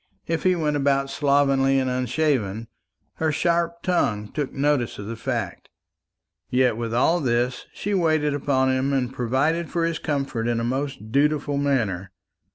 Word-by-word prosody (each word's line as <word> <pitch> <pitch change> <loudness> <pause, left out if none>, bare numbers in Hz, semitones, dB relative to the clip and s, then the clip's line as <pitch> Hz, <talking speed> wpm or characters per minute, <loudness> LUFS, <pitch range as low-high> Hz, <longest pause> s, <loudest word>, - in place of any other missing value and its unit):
If 165 -1 -1
he 185 -1 +3
went 150 -3 0
about 140 -1 +1
slovenly 140 -1 +3
and 130 -1 +1
unshaven, 125 -4 0 0.5
her 160 -1 +1
sharp 170 +2 0
tongue 105 - 0
took 145 -3 -3
notice 140 -3 0
of 105 - -7
the 115 +2 -5
fact. 115 -5 -4 0.8
Yet 125 -2 +2
with 115 0 -4
all 135 +9 +3
this, 125 -2 -1
she 205 - -3
waited 155 -5 +2
upon 130 -2 +1
him, 130 +2 0
and 130 -2 0
provided 135 +8 0
for 170 -2 0
his 165 -2 -2
comfort 135 -6 -2
in 120 -1 0
a - - -2
most 130 -3 -3
dutiful 145 +1 +1
manner. 110 -10 0
135 Hz, 160 wpm, -24 LUFS, 120-150 Hz, 0.8 s, he